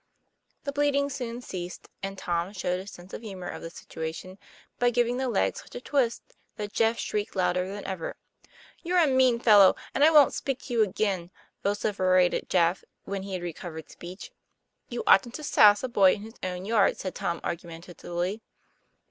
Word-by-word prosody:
The 280 Hz, -, -3 dB
bleeding 285 Hz, 0 st, +1 dB
soon 245 Hz, -2 st, -5 dB
ceased, 180 Hz, -6 st, -7 dB
and 195 Hz, 0 st, -5 dB
Tom 175 Hz, +2 st, -2 dB
showed 180 Hz, -2 st, -1 dB
his 190 Hz, +2 st, -8 dB
sense 180 Hz, 0 st, -13 dB
of -, -, -6 dB
the 225 Hz, -, -8 dB
humor 185 Hz, -3 st, -7 dB
of -, -, -6 dB
the 165 Hz, -, -6 dB
situa 160 Hz, -1 st, -6 dB
tion 185 Hz, +3 st, -10 dB, 0.4 s
by 245 Hz, -, +4 dB
giving 240 Hz, 0 st, +1 dB
the 260 Hz, -1 st, -1 dB
leg 220 Hz, -, +1 dB
such -, -, -11 dB
a -, -, -4 dB
twist 250 Hz, -2 st, 0 dB, 0.3 s
that 210 Hz, -1 st, -6 dB
Jeff 225 Hz, 0 st, +2 dB
shrieked 210 Hz, -2 st, -3 dB
louder 180 Hz, 0 st, +1 dB
than 205 Hz, 0 st, -7 dB
ever. 185 Hz, -4 st, -4 dB, 0.7 s
'You're 360 Hz, +1 st, 0 dB
a. 345 Hz, -, +6 dB
mean 260 Hz, -3 st, +3 dB
fellow, 205 Hz, -5 st, +7 dB, 0.2 s
and 280 Hz, -, +2 dB
I 310 Hz, -, +8 dB
wont 300 Hz, -3 st, +6 dB
speak 270 Hz, -2 st, -2 dB
to 250 Hz, -, -6 dB
you 230 Hz, -, +3 dB
again," 190 Hz, -3 st, -1 dB, 0.3 s
vociferated 185 Hz, -3 st, +1 dB
Jeff 175 Hz, 0 st, +2 dB, 0.2 s
when 200 Hz, -1 st, -4 dB
he 195 Hz, 0 st, -7 dB
had 180 Hz, -1 st, -3 dB
recovered 160 Hz, -2 st, -7 dB
speech. 185 Hz, -, -10 dB, 0.3 s
' -, -, -50 dB
You 240 Hz, -2 st, -4 dB
oughtn't 235 Hz, +5 st, +5 dB
to 305 Hz, -, -6 dB
sass 205 Hz, -6 st, +6 dB
a -, -, 0 dB
boy 195 Hz, -6 st, +5 dB
in 205 Hz, -, -6 dB
his 225 Hz, +1 st, -11 dB
own 180 Hz, 0 st, -4 dB
yard," 215 Hz, -2 st, +3 dB
said 185 Hz, -, -5 dB
Tom 170 Hz, -1 st, -2 dB
argumentatively. 175 Hz, +3 st, -5 dB
200 Hz, 190 wpm, -27 LUFS, 180-240 Hz, 0.7 s, I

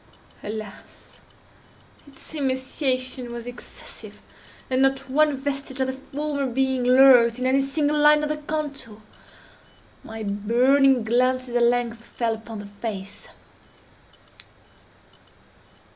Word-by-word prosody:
Alas! 215 Hz, -1 st, -9 dB, 0.9 s
its 280 Hz, +2 st, -8 dB
emaciation 260 Hz, -2 st, -2 dB
was 235 Hz, -1 st, -7 dB
excessive, 245 Hz, 0 st, -9 dB, 0.5 s
and 260 Hz, -1 st, +1 dB
not 270 Hz, 0 st, +1 dB
one 295 Hz, +1 st, +2 dB
vestige 275 Hz, -1 st, -4 dB
of 265 Hz, -, +2 dB
the 260 Hz, -, -3 dB
former 280 Hz, +1 st, -3 dB
being 260 Hz, 0 st, 0 dB
lurked 250 Hz, -2 st, +6 dB
in 255 Hz, -, -3 dB
any 265 Hz, +1 st, +3 dB
single 295 Hz, +2 st, 0 dB
line 300 Hz, 0 st, +5 dB
of 300 Hz, -, -1 dB
the 305 Hz, -, -1 dB
contour. 295 Hz, -7 st, -5 dB, 1.0 s
My 225 Hz, 0 st, -7 dB
burning 245 Hz, +6 st, +3 dB
glances 250 Hz, +2 st, 0 dB
at 240 Hz, -, +3 dB
length 235 Hz, -1 st, +1 dB
fell 230 Hz, -1 st, -2 dB
upon 220 Hz, 0 st, -8 dB
the 205 Hz, -, -8 dB
face. 200 Hz, -1 st, -7 dB
260 Hz, 115 wpm, -24 LUFS, 235-275 Hz, 1.0 s, lurked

